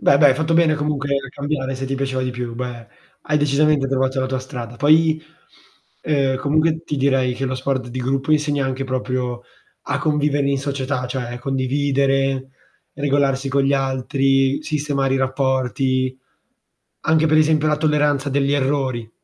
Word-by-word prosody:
Beh 140 - +4
dai, 145 -1 +7
hai - - +3
fatto 160 +1 0
bene 165 -1 +4
comunque 145 -1 -2
a 135 -1 -2
cambiare 140 -1 -3
se 135 +1 -4
ti 135 - -2
piaceva 135 -1 -2
di 130 0 -1
più, 120 -1 -5
beh 120 -1 -6 0.4
hai 150 - +3
decisamente 145 -1 +2
trovato 130 0 0
la 130 - 0
tua 130 0 -2
strada. 125 -3 -7
Poi, 155 +3 +4 0.8
ehm, 140 -3 +1
comunque, 155 +4 +1
ti 150 - -3
direi 135 -2 +2
che 130 +2 -3
uno 130 0 -2
sport 130 -1 -2
di 125 +2 -6
gruppo 135 +3 -1
insegna 150 -2 +1
anche 130 +1 -3
proprio 125 -2 -3 0.5
a - - 0
convivere 145 -2 +1
in 140 - +1
società, 135 -2 -2
cioè 125 -1 -4
condividere, 135 0 0 0.4
regolarsi 140 -1 0
con 140 +1 +1
gli 135 +1 +2
altri, 135 0 +1
sistemare 140 -3 -1
i - - +2
rapporti, 130 -1 0 0.9
anche 160 0 +3
per 155 0 +4
esempio 155 0 +3
la 150 - +2
tolleranza 150 -2 +1
degli 140 0 +1
errori. 130 -5 -1
135 Hz, 165 wpm, -20 LUFS, 130-145 Hz, 0.9 s, dai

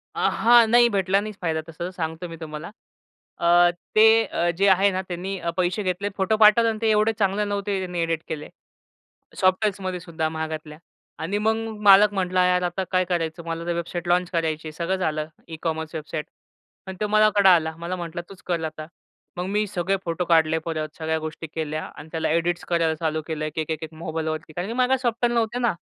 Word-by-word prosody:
अ, - - +1
हां, 235 0 +5
नाही 240 +1 +6
भेटला 195 -2 +2
नाहीच 215 0 -6
फायदा 160 -2 -1
तसं, 170 +2 -5
सांगतो 165 -1 -4
मी 165 - -8
तुम्हाला. 155 +1 -7 0.7
अ, 175 +1 +5 0.2
ते 220 +1 +7
अ, 170 +1 -1
जे 200 +2 +3
आहे 195 +1 +5
ना 185 0 -2
त्यांनी, 185 +2 -4
अ, 170 - -3
पैसे 180 +3 0
घेतले 185 +2 -1
फोटो 195 +3 +1
पाठवला 220 +2 +6
आणि 220 -1 -3
ते 225 - +2
एवढे 215 +1 +3
चांगले 200 +1 +1
नव्हते 200 -1 -2
त्यांनी 180 -2 -4
एडिट 165 -1 -1
केले. 150 -1 -6 0.9
सॉफ्टवेअरमध्येसुद्धा 185 -4 0
महागातल्या. 155 -1 -5 0.4
आणि 180 +6 -2
मग 220 +1 +2 0.3
मालक 205 +1 +7
म्हटला, 185 -1 +1
"यार, 180 0 +2
आता 180 +2 -1
काय 185 -1 +2
करायचं? 170 -1 -2
मला 165 0 -4
तर 175 - -1
वेबसाईट 170 +1 -4
लॉन्च 180 0 +2
करायचीय 160 -2 -2
.सगळं 170 +4 -2
झालं. 155 -4 -1 0.2
E-commerce 160 -1 -4
website." 155 0 -4 0.6
अन् 190 - -6
तो 210 - +1
माझ्याकडं 210 -2 +5
आला. 160 -3 +3
मला 170 +2 -4
म्हटला 170 -1 -5
तूच 195 -1 -13
कर 170 -2 -1
आता. 155 0 -6 0.5
मग 180 - -2
मी 210 +2 0
सगळे 195 0 -1
फोटो 170 +1 -2
काढले 160 -1 +3
परत, 155 -2 -3
सगळ्या 160 0 -1
गोष्टी 155 +1 -6
केल्या 155 0 -4
अन् 155 - -10
त्याला 160 -1 -1
एडिट 170 +2 0
करायला 165 -2 +1
चालू 155 0 -2
केलं 155 -2 -3
एक-एक, 155 0 -4
एक-एक 160 0 -5
मोबाईलवरती. 155 -1 -4
कारण 175 +4 -4
की 225 - -4
माझ्याकडं 255 +1 +2
सॉफ्टवेअर 240 -1 0
नव्हते 230 +1 0
ना. 235 -2 +2
175 Hz, 190 wpm, -24 LUFS, 160-200 Hz, 0.9 s, ते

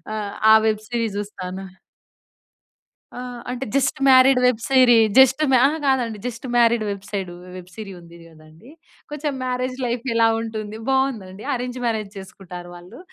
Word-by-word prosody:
ఆహ్, 205 -2 -4 0.2
ఆ - - +9
web 215 -1 0
series 230 -4 -2
జూస్తాను. 190 -2 -7 1.5
ఆ! - - -5 0.3
అంటే 255 +2 -4
జస్ట్ 275 -1 +1
మ్యారీడ్ 260 0 +6
వెబ్ 250 -3 +2
సీరీ 255 -3 +6 0.2
జస్ట్ 265 +1 +6
మ్యా 255 - +5
అహా! 305 +3 -2
కాదండి. 245 -5 0
జస్ట్ 245 +1 -6
మ్యారీడ్ 235 -1 +3
వెబ్సైడు 195 -2 -5 0.2
వెబ్ 180 -1 -10
సీరీ 215 -3 -8
ఉంది 170 0 -15
కదండీ. 160 +6 -18 0.4
కొంచెం 295 0 -3
మ్యారేజ్ 255 0 -3
లైఫ్ 240 0 -3
ఎలా 230 0 +4
ఉంటుంది? 220 -1 -6
బావుందండి. 230 -8 -1
అరేంజ్ 250 0 -4
మ్యారేజ్ 215 -3 -2
చేసుకుంటారు 185 -2 -10
వాళ్ళు. 180 +7 -13
230 Hz, 145 wpm, -21 LUFS, 195-255 Hz, 1.5 s, ఆ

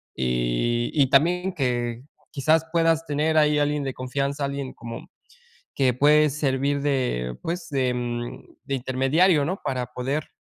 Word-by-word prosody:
y 60 - 0
y 140 -4 +3
también 180 +7 +3
que 120 -4 -2 0.3
quizás 155 +3 +2
puedas 165 -1 +2
tener 155 +1 0
ahí 150 -1 +4
alguien 145 0 0
de 135 -1 -3
confianza, 140 +3 -2
alguien 140 -1 -4
como 115 -1 -9 0.7
que 130 -3 +2
puede 150 +4 +5
servir 140 0 0
de 125 - -1
pues, 170 +1 -4
de, 130 -3 0
mm, 120 -1 -5
de 140 - -3
intermediario, 135 +6 +2
¿no? 185 +6 -3
Para 125 -2 -2
poder, 135 +5 -3
140 Hz, 145 wpm, -24 LUFS, 125-150 Hz, 0.7 s, puede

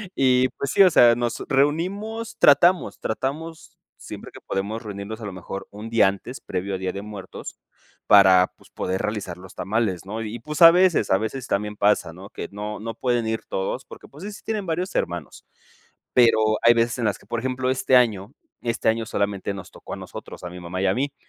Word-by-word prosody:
y, 130 -1 +3
pues, 140 - -2
sí, 195 - +6
o 185 - +7
sea, 120 -5 +6
nos 120 0 -2
reunimos, 185 +11 0
tratamos, 145 - +4
tratamos 155 +8 -4 0.2
siempre - - -9
que - - -12
podemos 105 +4 -3
reunirnos 105 +2 -7
a - - -6
lo 100 - -6
mejor 95 +2 -7
un 105 +2 -8
día 115 -4 +5
antes 100 +6 -4
previo 95 +2 -3
a - - -2
Día 95 -1 -2
de 100 - -5
Muertos 105 -2 -9 0.5
para, 95 -2 +6
pues, - - -21
poder 95 +1 -2
realizar 105 -5 -3
los 95 0 -13
tamales, 100 -4 -1
¿no? 110 +3 -5
Y 110 +2 -5
y, - - -7
pues, 150 +7 -6
a 165 - +12
veces 175 - +3
a 95 - +5
veces 125 +4 -4
también 105 +1 -1
pasa, 100 -5 +2
¿no?, 95 +4 -11
que - - -6
no 105 +1 -5
no 115 0 -4
pueden 120 -2 0
ir 110 0 -1
todos 95 +7 -3
porque, - - -13
pues, 150 +6 -13
sí, 210 - -5
sí - - -12
tienen 215 -3 -2
varios 175 +3 -2
hermanos. 85 -2 -3 0.7
Pero 120 -3 +5 0.2
hay 120 0 +7
veces 115 +1 +1
en 115 - 0
las - - 0
que, - - -20
por 115 - -2
ejemplo, 130 +1 -2
este 130 0 +2
año 110 -1 +2 0.3
este 115 -1 0
año 115 0 0
solamente 100 -1 -2
nos 95 -2 -9
tocó - - -10
a - - -5
nosotros, - - -10
a 90 - -5
mi 90 +1 -9
mamá 90 +2 -5
y - - +1
a 95 - +3
mí. 140 +4 -2
115 Hz, 215 wpm, -23 LUFS, 100-135 Hz, 0.7 s, a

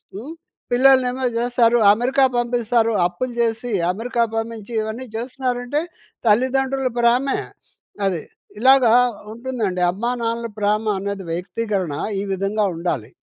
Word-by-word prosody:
హ్మ్. 250 +11 -7 0.4
పిల్లలనేమో 255 0 +4
జేస్తారు, 240 0 +3 0.2
అమెరికా 255 +5 +1
పంపిస్తారు, 235 -1 +1
అప్పులు 240 +8 -5
జేసి 230 +1 -1 0.2
అమెరికా 235 +4 -1
పంపించి 225 0 -5
ఇవన్నీ 220 +4 -5
జేస్తున్నారంటే, 250 +3 -2 0.5
తల్లిదండ్రుల 260 +4 +2
ప్రేమే. 245 +3 +2 0.7
అది. 175 -5 -2 0.4
ఇలాగా 260 -3 +6 0.4
ఉంటుందండి. 230 -6 -3
అమ్మా 235 +7 -2
నాన్నల 230 0 -2
ప్రేమనేది 205 -2 -1
వ్యక్తీకరణ 190 -1 -2 0.3
ఈ 200 - -2
విధంగా 200 +3 0
ఉండాలి. 160 -10 -3
235 Hz, 105 wpm, -21 LUFS, 210-250 Hz, 0.7 s, ఇలాగా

